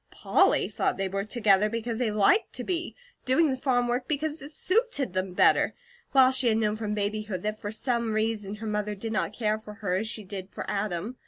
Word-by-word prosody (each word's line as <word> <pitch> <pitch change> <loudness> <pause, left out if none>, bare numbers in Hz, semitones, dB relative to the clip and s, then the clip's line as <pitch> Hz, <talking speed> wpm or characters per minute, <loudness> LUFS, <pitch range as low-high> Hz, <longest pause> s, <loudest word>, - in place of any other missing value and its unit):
Polly - - +2
thought - - -1
they 195 0 -1
were 195 +1 -2
together 210 -3 +3
because 230 +1 -3
they 245 -3 +1
liked 215 - +3
to - - -3
be; 350 -2 -2 0.3
doing 290 +4 +3
the - - 0
farm 250 -2 +1
work 245 +1 -1
because 310 +1 -1
it 280 - -8
suited 370 - 0
them 185 0 -2
better; - - +3 0.4
while 260 -1 +6
she 260 -1 +4
had 220 -1 +3
known 215 -1 +1
from 215 -1 -3
babyhood 210 -2 -3
that 215 0 -3
for 205 - -4
some 235 0 -1
reason 215 -2 -1
her 220 +2 -8
mother 210 -1 -2
did 220 +3 -4
not 215 - -1
care 215 -1 -1
for 210 -1 -11
her 205 -4 -3
as 220 +3 -2
she 220 -1 -3
did 190 -1 -7
for - - -7
Adam. 205 +3 -3
215 Hz, 220 wpm, -27 LUFS, 210-250 Hz, 0.4 s, while